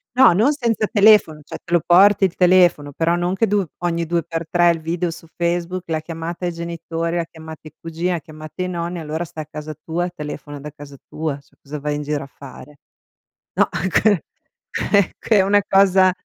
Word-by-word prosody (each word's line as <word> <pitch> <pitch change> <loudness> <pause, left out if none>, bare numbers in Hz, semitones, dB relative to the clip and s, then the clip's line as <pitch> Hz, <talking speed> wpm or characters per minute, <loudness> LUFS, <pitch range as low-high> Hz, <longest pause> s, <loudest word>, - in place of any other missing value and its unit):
No, 255 -7 +7
non 220 +11 +3
senza 235 -6 -1
telefono, 205 -8 +5
cioè 145 - -9
te 180 - -13
lo 175 - +4
porti 195 +3 +6
il 185 - -2
telefono, 175 -5 +4
però 165 +4 0
non 175 +1 -1
che 225 +4 +1
du 205 -1 +1
ogni 170 -1 -1
due 170 0 -1
per 165 -1 -4
tre 175 0 +4
il 165 -1 -4
video 170 +2 -2
su 165 0 -9
Facebook, 175 +1 -1
la 160 -1 -2
chiamata 165 +2 -6
ai 175 - -1
genitori, 170 0 -4
la 170 - 0
chiamata 160 -1 -11
ai 155 - -12
cugini, 165 +2 -3
la 175 - -1
chiamata 155 +3 -10
ai 180 - -1
nonni, 175 0 -4
allora 160 +1 -4
sta 160 - -10
a 155 - -4
casa 155 0 -7
tua, 170 +4 -3
telefona 150 -3 -8
da 150 - -8
casa 145 -1 -13
tua, 155 -3 -4
scusa, 140 +1 -10
vai 150 +1 -2
in 150 - -3
giro 145 -1 -3
a - - -14
fare. 140 +1 -13 0.7
No, - - +2
è 190 - -3
che 200 -1 +2 0.7
eh, 200 -3 +3
che 220 - +2
è - - +6
una 205 +1 +3
cosa 190 -1 +5
170 Hz, 210 wpm, -20 LUFS, 155-180 Hz, 0.7 s, No